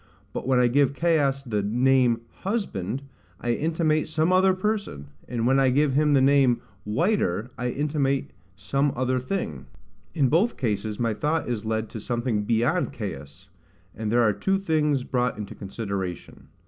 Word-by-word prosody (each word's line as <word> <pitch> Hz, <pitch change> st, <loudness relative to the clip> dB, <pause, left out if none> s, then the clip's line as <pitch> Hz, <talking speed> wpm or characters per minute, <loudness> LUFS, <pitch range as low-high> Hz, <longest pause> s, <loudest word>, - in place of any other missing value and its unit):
But -, -, -4 dB
when 130 Hz, -1 st, +3 dB
I 125 Hz, -, +4 dB
give 140 Hz, +2 st, +2 dB
Caius 145 Hz, -4 st, +1 dB
the 110 Hz, -5 st, -1 dB
name 120 Hz, +2 st, +2 dB, 0.2 s
HUSBAND, 140 Hz, -, -2 dB, 0.4 s
I 120 Hz, -1 st, 0 dB
intimate 155 Hz, +2 st, 0 dB
some 160 Hz, +3 st, +1 dB
other 185 Hz, 0 st, +4 dB
person; 200 Hz, -, -3 dB, 0.2 s
and 115 Hz, -2 st, -2 dB
when 135 Hz, +2 st, +4 dB
I 135 Hz, -1 st, +4 dB
give 140 Hz, +2 st, +2 dB
him 150 Hz, +1 st, +3 dB
the 135 Hz, -, +5 dB
name 135 Hz, -3 st, +4 dB, 0.3 s
WHITER, 125 Hz, -, 0 dB
I 125 Hz, +1 st, -2 dB
intimate 140 Hz, 0 st, -1 dB, 0.2 s
some 135 Hz, +9 st, 0 dB
other 130 Hz, 0 st, 0 dB
thing: 100 Hz, -, -4 dB, 0.5 s
in 145 Hz, -5 st, +3 dB
both 175 Hz, -, +2 dB
cases 105 Hz, -3 st, -2 dB
my 115 Hz, -2 st, +1 dB
thought 155 Hz, +8 st, -1 dB
is 115 Hz, -3 st, -3 dB
led 110 Hz, 0 st, -1 dB
to 110 Hz, -, -7 dB
something 120 Hz, -2 st, -1 dB
beyond 125 Hz, -, +1 dB
Caius, 90 Hz, -, -7 dB, 0.5 s
and 110 Hz, -1 st, -3 dB
there 120 Hz, +1 st, +4 dB
are 105 Hz, -2 st, +3 dB
two 195 Hz, -, 0 dB
things 150 Hz, -7 st, +1 dB
brought 125 Hz, -3 st, -1 dB
into 105 Hz, -2 st, -6 dB
consideration. 100 Hz, -3 st, -6 dB
130 Hz, 160 wpm, -25 LUFS, 110-150 Hz, 0.5 s, the